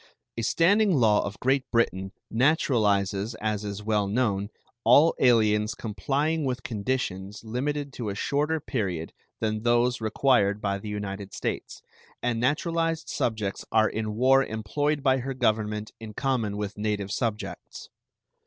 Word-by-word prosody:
A 115 - -3
standing 190 - +3
law 110 -6 +4
of 100 - -6
Great 130 +1 +1
Britain 95 -5 0 0.2
naturalizes, 110 -6 +2
as 105 -1 -1
is 100 0 -5
well 105 -2 +1
known, 100 -2 0 0.3
all 160 +3 +6
aliens 105 -3 +3
complying 140 +9 -1
with 130 -2 -2
conditions 105 -3 -3
limited 140 +5 -3
to 115 -4 -4
a 100 - -4
shorter 150 +8 0
period 95 - -3 0.3
than 110 -1 -1
those 120 +1 +2
required 110 -2 +2
by 100 -2 -1
the 105 - -7
United 100 -1 -5
States, - - -4 0.4
and 120 -2 -1
naturalized 165 +5 0
subjects 110 -4 -2
are 110 -1 +4
in 110 -1 -3
war 135 +3 +5
employed 140 +7 -1
by 130 -1 +3
her 135 +1 -4
Government 105 -3 0
in 110 -2 -9
common 120 -7 -1
with 105 0 -4
native 105 -2 -2
subjects. 110 -3 -4
110 Hz, 140 wpm, -26 LUFS, 105-130 Hz, 0.4 s, all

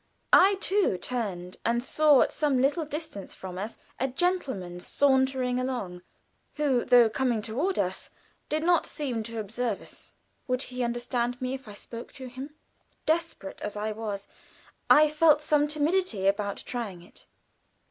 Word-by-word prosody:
I 390 +2 +7
too 390 - +1
turned, 185 -5 -3
and 235 +1 +1
saw 300 0 +5
at - - +2
some 290 -4 +1
little 290 +5 +2
distance 300 - -6
from 185 -1 -7
us 210 +4 -5 0.2
a 265 - +1
gentleman 260 - -1
sauntering 265 +2 +2
along, 240 -9 -3 0.5
who, 275 -5 +2
though 245 -2 +7
coming 230 -1 0
toward 280 - -1
us, - - -1 0.4
did 310 +1 0
not 345 -1 +3
seem 255 -6 -2
to 230 +1 -6
observe 225 +3 -2
us. - - -11 0.3
Would 255 +1 0
he 250 0 -5
understand 240 0 -1
me 255 0 -2
if 265 -3 -7
I 205 - -9
spoke 230 +3 -9
to 265 -2 -9
him? 260 +4 -8 0.5
Desperate 320 - -1
as 210 - -4
I 210 +1 -2
was, 210 -2 -5 0.6
I 305 +1 +8
felt 305 0 +4
some 300 -1 +2
timidity 300 - 0
about 200 0 +1
trying 210 -8 -5
it. 175 - -16
250 Hz, 155 wpm, -28 LUFS, 215-295 Hz, 0.6 s, I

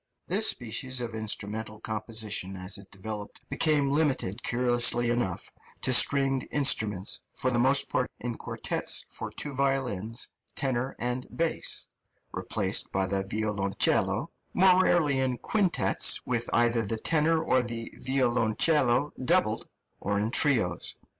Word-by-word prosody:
This 205 +5 +2
species 130 +2 -2
of 120 -2 -5
instrumental 110 0 -3
composition 110 -3 -4
as 90 +2 -1
it 100 - -15
developed 105 +1 -8
became 145 -3 +2
limited, 135 -8 0
curiously 120 -1 +3
enough, 120 -7 -2 0.3
to 130 - +3
stringed 135 0 +4
instruments, 105 -9 +1 0.2
for 130 -1 0
the 120 - +1
most 135 +3 +4
part 125 - 0
in 120 -1 -4
quartets - - -1
for - - -5
two 145 - -6
violins, 130 -5 -2 0.3
tenor, 130 -1 -2
and 125 +1 -3
bass 165 0 0 0.5
(replaced - - -1
by 95 0 0
the 95 +1 -1
violoncello), 100 -1 0 0.2
more 185 0 +5
rarely 150 -8 +2
in 130 -2 0
quintets, 205 - +2
with 120 -1 -1
either 120 0 +2
the 110 +1 -3
tenor 160 +6 +2
or 130 -4 +2
the 115 -1 -6
violoncello 125 +2 +2
doubled, 130 -8 +1 0.3
or 100 +1 -1
in 110 +2 -1
trios. 110 - +2
120 Hz, 130 wpm, -28 LUFS, 110-135 Hz, 0.5 s, more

